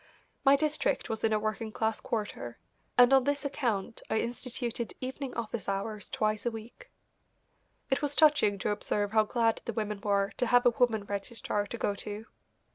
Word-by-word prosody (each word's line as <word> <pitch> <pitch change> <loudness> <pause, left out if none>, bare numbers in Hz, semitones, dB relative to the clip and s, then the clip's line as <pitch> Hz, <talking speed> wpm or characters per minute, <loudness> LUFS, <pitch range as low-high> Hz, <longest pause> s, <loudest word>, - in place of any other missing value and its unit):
My 275 0 +7
district 295 -3 0
was 220 - -4
in 225 - +3
a 215 - +3
working 215 +1 -2
class 220 0 -1
quarter, 205 - -4 0.4
and 245 +1 +7
on 265 -1 +6
this 285 +2 0
account 235 -8 -2
I - - +1
instituted 240 -1 -4
evening 260 +1 -5
office 230 -3 -3
hours 205 +1 -3
twice 215 -1 0
a 240 - +1
week. 235 - -10 1.0
It 265 - +2
was 290 -1 -1
touching 300 -10 +5
to 200 - -1
observe 205 0 -1
how 220 -1 +4
glad 225 0 +1
the 235 - -3
women 210 -2 -3
were 200 -2 +1
to 250 - +1
have 245 +1 +4
a 245 - +7
woman 230 -4 +2
registrar 205 +1 -2
to 235 - -5
go 205 - 0
to. 210 +2 -6
225 Hz, 180 wpm, -30 LUFS, 210-250 Hz, 1.0 s, My